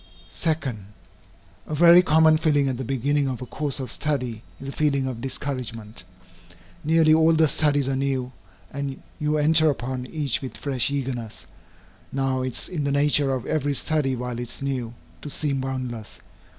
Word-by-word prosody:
2. 160 Hz, -2 st, +1 dB, 1.1 s
A 155 Hz, -, -3 dB
very 170 Hz, +3 st, +8 dB
common 160 Hz, -2 st, +5 dB
feeling 150 Hz, -3 st, +2 dB
at 130 Hz, -2 st, -1 dB
the 130 Hz, -, -4 dB
beginning 135 Hz, +3 st, 0 dB
of 130 Hz, -2 st, -3 dB
a 125 Hz, -, -6 dB
course 145 Hz, +2 st, -4 dB
of 130 Hz, -3 st, -4 dB
study, 125 Hz, -8 st, -2 dB, 0.2 s
is 135 Hz, -, -8 dB
a -, -, -3 dB
feeling 140 Hz, -2 st, +1 dB
of 125 Hz, -3 st, -4 dB
discouragement. 125 Hz, -5 st, -4 dB, 0.8 s
Nearly 160 Hz, 0 st, +4 dB
all 160 Hz, +1 st, +5 dB
the 160 Hz, 0 st, +4 dB
studies 145 Hz, -1 st, +1 dB
are 135 Hz, -, 0 dB
new, 130 Hz, -2 st, -1 dB, 0.4 s
and 140 Hz, -1 st, -5 dB, 0.2 s
you 150 Hz, 0 st, +1 dB
enter 155 Hz, +1 st, +4 dB
upon 130 Hz, -2 st, -3 dB
each 155 Hz, 0 st, -1 dB
with 130 Hz, -, -7 dB
fresh 135 Hz, -4 st, 0 dB
eagerness. 125 Hz, -5 st, -4 dB, 0.7 s
Now, 135 Hz, -1 st, 0 dB
it 130 Hz, -2 st, -3 dB
is -, -, -3 dB
in 160 Hz, -5 st, -3 dB
the 140 Hz, -, 0 dB
nature 145 Hz, 0 st, +3 dB
of 130 Hz, -3 st, -2 dB
every 145 Hz, -2 st, 0 dB
study 145 Hz, -3 st, +1 dB
while 125 Hz, -1 st, -4 dB
it 120 Hz, -1 st, -5 dB
is -, -, -5 dB
new, 125 Hz, -4 st, -3 dB, 0.3 s
to -, -, -6 dB
seem 140 Hz, -2 st, -1 dB
boundless. 130 Hz, -4 st, -5 dB
140 Hz, 175 wpm, -24 LUFS, 130-150 Hz, 1.1 s, very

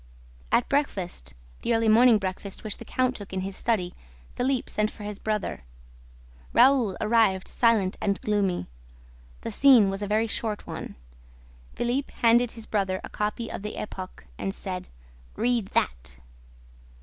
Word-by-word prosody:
At 240 Hz, -, +3 dB
breakfast 190 Hz, -, -2 dB, 0.3 s
the 235 Hz, -, +1 dB
early 225 Hz, 0 st, +2 dB
morning 230 Hz, +1 st, +7 dB
breakfast, 195 Hz, 0 st, -5 dB
which 215 Hz, -2 st, -3 dB
the -, -, -10 dB
count 255 Hz, 0 st, 0 dB
took 200 Hz, -2 st, -8 dB
in 190 Hz, -, -1 dB
his 195 Hz, 0 st, -4 dB
study 195 Hz, -7 st, 0 dB, 0.4 s
Philippe 255 Hz, 0 st, 0 dB
sent 210 Hz, 0 st, 0 dB
for 210 Hz, -, -11 dB
his 205 Hz, -1 st, -5 dB
brother. 215 Hz, -, -2 dB, 0.9 s
Raoul 255 Hz, -8 st, +5 dB
arrived 215 Hz, -4 st, +3 dB
silent 220 Hz, -6 st, +2 dB
and 200 Hz, -1 st, 0 dB
gloomy. 200 Hz, -, 0 dB, 0.8 s
The -, -, -4 dB
scene 250 Hz, -8 st, +6 dB
was 195 Hz, +1 st, -3 dB
a 205 Hz, -, -2 dB
very 215 Hz, +2 st, +2 dB
short 220 Hz, -1 st, -2 dB
one. -, -, -7 dB, 0.8 s
Philippe 250 Hz, +4 st, -1 dB
handed 235 Hz, +1 st, +5 dB
his 225 Hz, -2 st, -8 dB
brother 190 Hz, -3 st, 0 dB
a -, -, -7 dB
copy 210 Hz, +3 st, -3 dB
of -, -, -5 dB
the 210 Hz, +1 st, -6 dB
Epoque 185 Hz, -3 st, -7 dB
and 195 Hz, 0 st, -2 dB
said: 185 Hz, -2 st, -5 dB, 0.5 s
"Read 235 Hz, -4 st, +1 dB
that!" -, -, -1 dB
210 Hz, 150 wpm, -26 LUFS, 195-235 Hz, 0.9 s, morning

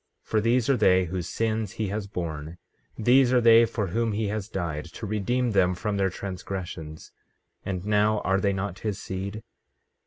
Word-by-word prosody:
15:12 -, -, -35 dB
For 110 Hz, -, +3 dB
these 115 Hz, +2 st, +2 dB
are 135 Hz, -, +3 dB
they 95 Hz, -4 st, +4 dB
whose 90 Hz, 0 st, -4 dB
sins 110 Hz, -3 st, -1 dB
he 110 Hz, -3 st, -2 dB
has 105 Hz, 0 st, -3 dB
borne; 80 Hz, -4 st, -5 dB, 0.4 s
these 125 Hz, +3 st, +4 dB
are 125 Hz, -, +5 dB
they 115 Hz, 0 st, +7 dB
for 110 Hz, -2 st, -2 dB
whom 115 Hz, +3 st, 0 dB
he 105 Hz, 0 st, -1 dB
has 105 Hz, 0 st, -3 dB
died, 80 Hz, -7 st, -3 dB
to 90 Hz, +5 st, -8 dB
redeem 115 Hz, +4 st, 0 dB
them 90 Hz, -3 st, +3 dB
from 100 Hz, +3 st, -2 dB
their 95 Hz, -1 st, +2 dB
transgressions. 90 Hz, -4 st, -6 dB, 0.5 s
And 95 Hz, -1 st, -4 dB
now, 105 Hz, 0 st, +2 dB
are 95 Hz, +1 st, +1 dB
they 100 Hz, -, +2 dB
not 95 Hz, -1 st, -3 dB
his 105 Hz, -1 st, -3 dB
seed? 100 Hz, +3 st, -5 dB
100 Hz, 185 wpm, -26 LUFS, 95-110 Hz, 0.5 s, they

